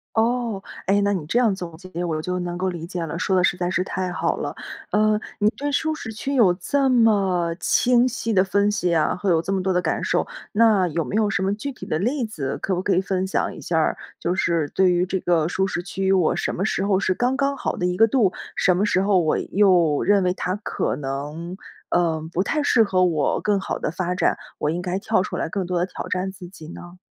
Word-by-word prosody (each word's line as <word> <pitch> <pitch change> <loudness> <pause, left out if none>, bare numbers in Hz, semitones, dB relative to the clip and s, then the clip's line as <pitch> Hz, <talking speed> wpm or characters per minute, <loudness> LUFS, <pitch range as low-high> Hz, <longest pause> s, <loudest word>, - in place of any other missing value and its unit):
哦， 230 -3 0 0.3
诶， 200 +1 +3
那 200 0 +2
你 175 -6 -3
这 235 - 0
样 230 -5 +3
总 170 -4 -7
结 185 -1 -6
我 160 -3 -1
就 180 +2 -2
能 175 0 -4
够 185 0 -1
理 170 -1 -6
解 175 -2 -4
了， 160 +2 -5
说 190 +1 +1
得 180 - +3
实 180 - +3
在 180 0 -2
是 185 0 0
太 185 -1 -3
好 180 - -1
了。 - - -4 0.4
呃， 215 0 +3 0.2
你 210 - +3
对 290 +1 -4
舒 315 +2 0
适 245 -7 -6
区 270 +6 -4
有 225 -9 +5
这 275 +7 0
么 195 -8 +3
清 245 0 +3
晰 230 -2 -2
的 185 -1 +4
分 200 +2 +1
析 180 -4 0
啊， 155 - +2
会 190 +1 -2
有 165 -2 +3
这 195 - -2
么 190 - 0
多 190 0 0
的 180 - +2
感 - - -1
受， - - +1 0.3
那 210 -4 +4
有 165 0 -2
没 - - -4
有 215 -1 +2
什 190 -1 -1
么 195 +1 +1
具 275 +7 -4
体 250 - -10
的 155 - -1
例 250 +5 0
子， 145 -11 -4
可 190 - -1
不 180 - -1
可 195 - +1
以 185 - +3
分 190 -1 -1
享 - - -1
一 - - -10
下 165 - -1
儿？ 160 - +2 0.2
就 175 - -1
是 170 -4 +1
对 185 -1 +4
于 175 +1 +2
这 190 0 -2
个 165 -3 +1
舒 190 +2 0
适 175 -1 -3
区， 190 +1 -1
我 185 -4 +3
什 - - -2
么 190 - -1
时 195 - 0
候 195 -1 +2
是 185 -1 +1
刚 250 +6 0
刚 280 0 +1
好 - - -3
的 180 - -1
一 180 0 0
个 225 +3 +5
度， 215 -6 +2 0.2
什 180 - +3
么 195 +4 +1
时 190 -2 +2
候 195 -2 +3
我 155 -2 +1
又 180 -7 +3
认 200 -1 +3
为 180 0 +1
它 185 0 -2
可 - - -1
能， 150 +6 -5 0.3
呃， 160 -2 0
不 180 - +1
太 300 +9 0
适 230 - +4
合 185 -3 +2
我 155 -5 +1
更 205 -2 +1
好 - - -3
的 - - -3
发 180 0 -2
展， - - +2 0.2
我 150 - 0
应 175 - -2
该 180 +1 -2
跳 215 0 +1
出 - - -4
来 - - -1
更 185 +1 -3
多 180 -1 -1
地 175 - +1
挑 - - -7
战 185 +1 -2
自 180 -2 -11
己 160 -5 -12
呢？ 175 +1 -11
185 Hz, 275 characters per minute, -23 LUFS, 175-210 Hz, 0.4 s, 有